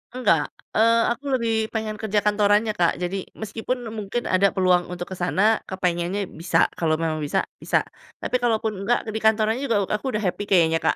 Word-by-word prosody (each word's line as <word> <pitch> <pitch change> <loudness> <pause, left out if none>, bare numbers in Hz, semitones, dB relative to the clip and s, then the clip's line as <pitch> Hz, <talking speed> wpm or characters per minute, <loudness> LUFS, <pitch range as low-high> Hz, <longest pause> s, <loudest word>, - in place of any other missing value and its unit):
Engga, 170 -12 +2 0.2
eee, 230 +1 +4
aku 275 - -4
lebih 225 -2 0
pengen 215 -1 -3
kerja 210 -1 0
kantorannya 210 +1 +3
Kak, 170 - +3
jadi 180 +2 -4
meskipun 225 +2 -4
mungkin 220 +2 -3
ada 195 +2 +2
peluang 180 -2 +3
untuk 175 0 -5
ke - - -4
sana, 205 +5 +2
kepengennya 180 +1 -1
bisa, 165 +2 +1 0.2
kalau 160 -2 +2
memang 160 -1 -2
bisa, 145 -1 0 0.2
bisa, - - +1 0.4
tapi 250 - 0
kalau 240 -2 +2
pun 220 - 0
enggak 235 +5 0
ke 220 - -5
di 220 - -3
kantorannya 220 +2 +2
juga 205 -3 +2
aku 210 +5 -2
udah 210 - -1
happy 200 +2 -2
kayaknya 165 -4 +3
Kak. - - +1
205 Hz, 190 wpm, -23 LUFS, 180-220 Hz, 0.4 s, eee